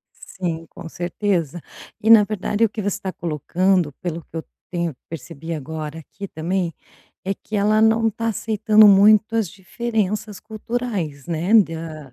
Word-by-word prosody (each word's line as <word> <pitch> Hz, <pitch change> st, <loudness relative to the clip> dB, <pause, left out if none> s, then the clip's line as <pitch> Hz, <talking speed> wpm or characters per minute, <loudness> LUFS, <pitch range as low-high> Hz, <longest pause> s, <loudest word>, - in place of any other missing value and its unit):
Sim, 165 Hz, -3 st, -5 dB
com 165 Hz, -, -10 dB
certeza 175 Hz, -2 st, -2 dB, 0.4 s
e 220 Hz, -, +1 dB
na 215 Hz, -2 st, +9 dB
verdade, 210 Hz, +1 st, 0 dB
o 225 Hz, -, +3 dB
que 215 Hz, +1 st, -5 dB
você 200 Hz, -1 st, -2 dB
tá 190 Hz, -1 st, -4 dB
colocando, 175 Hz, +1 st, 0 dB
pelo 170 Hz, +1 st, -5 dB
que 165 Hz, -, -12 dB
eu 160 Hz, -, -4 dB, 0.3 s
tenho 170 Hz, -4 st, -2 dB
percebi 160 Hz, +1 st, -7 dB
agora 155 Hz, +1 st, -6 dB
aqui 200 Hz, +6 st, -9 dB
também, 170 Hz, +1 st, -2 dB, 0.5 s
é 195 Hz, -, -1 dB
que 210 Hz, +2 st, -6 dB
ela 210 Hz, +2 st, +3 dB
não 225 Hz, 0 st, +4 dB
tá 230 Hz, +2 st, -3 dB
aceitando 215 Hz, 0 st, +4 dB
muito 215 Hz, +3 st, +5 dB
as 215 Hz, -6 st, +1 dB
diferenças 210 Hz, +1 st, -3 dB
culturais, 215 Hz, -, -4 dB
né, 175 Hz, +5 st, 0 dB
da 160 Hz, -, +1 dB
190 Hz, 155 wpm, -21 LUFS, 165-215 Hz, 0.5 s, na